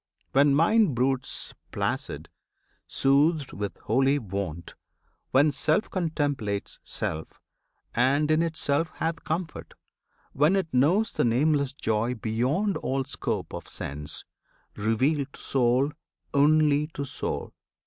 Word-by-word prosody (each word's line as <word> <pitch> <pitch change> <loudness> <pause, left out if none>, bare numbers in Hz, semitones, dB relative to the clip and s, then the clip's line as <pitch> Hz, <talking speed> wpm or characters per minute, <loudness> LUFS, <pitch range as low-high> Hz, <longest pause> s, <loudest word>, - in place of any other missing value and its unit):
When 140 +1 +4
mind 180 - +4
broods 130 +1 -1 0.2
placid, - - -3 0.6
soothed 140 +1 +2
with 100 -1 -4
holy 135 +5 +3
wont; 95 - -5 0.6
When 145 +3 +4
Self 155 +8 +1
contemplates 145 - -2
self, 80 0 -5 0.5
and 140 +5 +2
in 155 +1 +4
itself 160 -1 0
Hath 165 0 -2
comfort; 160 0 -4 0.6
when 150 +7 +3
it 185 -7 -1
knows 175 +12 +3
the - - +1
nameless 140 +3 +2
joy 115 -2 -1
Beyond 125 - 0
all 135 +1 -1
scope - - -4
of - - -6
sense, 75 +2 -6 0.5
revealed 130 +7 0
to - - -12
soul 130 +2 +2 0.4
Only 150 0 +4
to 140 - -3
soul! - - -4
140 Hz, 115 wpm, -27 LUFS, 120-155 Hz, 0.6 s, When